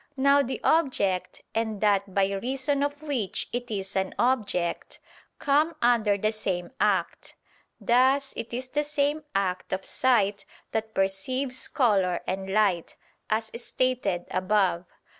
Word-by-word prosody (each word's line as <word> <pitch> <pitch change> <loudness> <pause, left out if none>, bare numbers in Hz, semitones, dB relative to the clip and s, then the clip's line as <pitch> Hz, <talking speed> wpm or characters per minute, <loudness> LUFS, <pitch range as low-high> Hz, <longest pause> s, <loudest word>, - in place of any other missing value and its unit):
Now 280 +1 +5
the 265 -1 -3
object, 255 - +1
and 220 -2 -1
that 200 -2 +1
by 195 0 +3
reason 265 +7 -1
of 290 +1 -2
which 260 -10 -2
it 245 0 -3
is 195 -2 -4
an 190 -1 -1
object, 215 -9 0 0.4
come 300 +4 +2
under 225 -4 +3
the 215 +2 0
same 190 -5 -3
act; - - 0 0.4
thus 265 +3 +3
it 230 - -6
is 255 +2 -4
the 295 +2 0
same 295 +1 0
act 185 -2 -1
of 190 0 -2
sight 205 -6 +2 0.3
that 220 0 -3
perceives 250 +8 -1
color 195 - +2
and 190 +1 -3
light, 195 -5 +1 0.3
as 220 0 -1
stated 240 -11 -1
above 185 -2 +1
(Q. - - -32
220 Hz, 140 wpm, -26 LUFS, 195-260 Hz, 0.4 s, Now